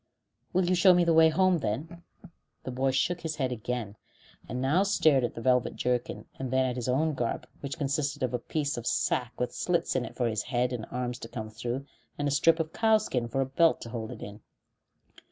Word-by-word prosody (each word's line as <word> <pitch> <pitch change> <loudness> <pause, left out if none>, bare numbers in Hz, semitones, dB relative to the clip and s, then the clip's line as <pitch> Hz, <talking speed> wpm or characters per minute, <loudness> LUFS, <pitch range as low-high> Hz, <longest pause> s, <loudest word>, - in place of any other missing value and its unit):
"Will 185 0 +2
you 180 - +2
show 180 0 +6
me 175 - +4
the 170 -1 +3
way 160 0 +7
home, 185 +2 +3
then?" 155 - -4 0.6
The 130 - -5
boy 130 +2 0
shook 165 +7 0
his 160 -2 -3
head 130 -4 -1
again, 115 -3 -4 0.5
and 125 - -3
now 140 +8 +2
stared 160 -9 +3
at 120 - -2
the 115 - -6
velvet 125 0 +2
jerkin, 125 -1 -2
then 130 0 +1
at 125 -1 -1
his 125 0 -3
own 155 +5 +2
garb, 120 -4 -2
which 140 +2 -5
consisted 145 -1 -1
of 125 -1 -1
a 125 - 0
piece 145 +2 -2
of 120 - -5
sack 125 -1 0
with 125 - -1
slits 175 -5 0
in 130 - +1
it - - -8
for 120 - 0
his 110 -2 -1
head 125 0 -1
and 115 -2 -5
arms 125 0 -3
to - - -7
come 110 -2 -6
through, 120 +4 -4 0.3
and 145 - -1
a - - 0
strip 160 +4 +4
of 160 0 -2
cow 220 -1 +4
skin 125 - -2
for 135 +4 -1
a - - +1
belt 160 +5 +3
to 115 - -7
hold 115 -2 -5
it - - -8
in. 105 +1 -9
130 Hz, 225 wpm, -28 LUFS, 120-160 Hz, 0.6 s, way